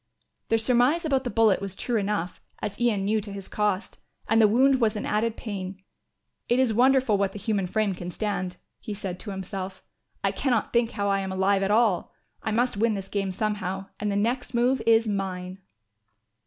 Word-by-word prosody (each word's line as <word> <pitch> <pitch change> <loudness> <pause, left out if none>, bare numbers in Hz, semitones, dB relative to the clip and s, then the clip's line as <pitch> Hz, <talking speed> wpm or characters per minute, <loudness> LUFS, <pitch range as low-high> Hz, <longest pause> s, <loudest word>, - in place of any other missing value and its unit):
The 225 - +4
surmise 250 +8 +3
about 270 -3 +1
the - - 0
bullet 225 -5 +3
was 195 -1 -4
true 240 +3 -1
enough, 200 -4 -2 0.2
as 210 +2 -5
Ian 215 -5 +2
knew 215 +1 +1
to 205 0 -8
his 195 -1 -7
cost, 210 -1 -1 0.3
and 225 +1 +4
the 215 - +7
wound 260 +4 +4
was 220 -1 +2
an 210 - -3
added 220 +1 0
pain. 195 -3 -6 0.7
"It 240 - +3
is 255 -4 +3
wonderful 255 -3 +4
what 195 -1 0
the - - -6
human 205 -2 -1
frame 215 +1 0
can 175 -1 -6
stand," 185 -2 -3 0.2
he 210 -3 -6
said 190 -3 -5
to 215 - -8
himself. 190 -1 -5 0.4
"I - - +2
cannot 245 -6 0
think 235 -1 +3
how 200 0 -1
I 195 0 +2
am 190 -1 -3
alive 195 +1 +2
at 195 - 0
all. 215 -4 +2 0.3
I - - -2
must 235 0 +1
win 225 +1 +2
this 195 -1 -6
game 200 -1 -1
somehow 195 -1 -3
and 210 -1 -1
the - - -1
next 240 +4 -1
move 245 +1 +2
is 225 0 +5
mine." 190 -2 -3
210 Hz, 200 wpm, -26 LUFS, 195-230 Hz, 0.7 s, the